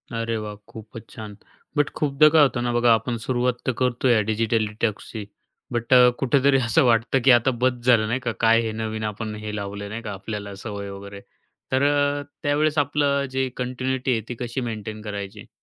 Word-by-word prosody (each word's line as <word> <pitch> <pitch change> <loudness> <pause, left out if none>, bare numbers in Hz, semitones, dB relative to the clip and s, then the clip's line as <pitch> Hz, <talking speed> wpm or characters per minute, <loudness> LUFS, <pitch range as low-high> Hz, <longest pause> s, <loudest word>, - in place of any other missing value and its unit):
अरे 115 0 -2
वाह! 105 -1 -6
खूपच 110 0 -11
छान. 105 -2 -9 0.4
बट 145 -1 +2
खूपदा 150 0 +4
काय 155 - +8
होतं 135 -4 +3
ना 120 - 0
बघा, 120 -1 +4
आपण 115 +2 -1
सुरुवात 125 0 0
तर - - +3
करतोय 125 -2 +2
डिजिटल 110 0 +1
डिटॉक्सची. 105 0 -4 0.5
बट 120 +2 0
अ, 125 -1 +8
कुठेतरी 135 +1 +3
असं 110 - +4
वाटतं 115 +3 +2
की 130 - +8
आता 125 +3 +1
बस 130 0 +4
झालं 115 -4 +4
नाही 120 +4 -1
का, 120 -3 -2
काय 115 +2 +3
हे - - -2
नवीन 110 0 -3
आपण 105 +1 -6
हे 105 0 -4
लावलं 100 0 -5
नाही 110 +3 -5
का 105 - -6
आपल्याला 100 +1 -6
सवय 100 -3 -5
वगैरे. 100 0 -9 0.5
तर 130 +1 +2
अ, 145 0 +2 0.2
त्यावेळेस 150 +1 +1
आपलं 140 0 +1
जे 130 0 +1
कंटिन्यूटी 130 +1 -2
आहे 115 -2 +1
ती 120 - -4
कशी 120 +2 -3
मेंटेन 110 0 -7
करायची? 100 -1 -7
115 Hz, 190 wpm, -23 LUFS, 110-130 Hz, 0.5 s, काय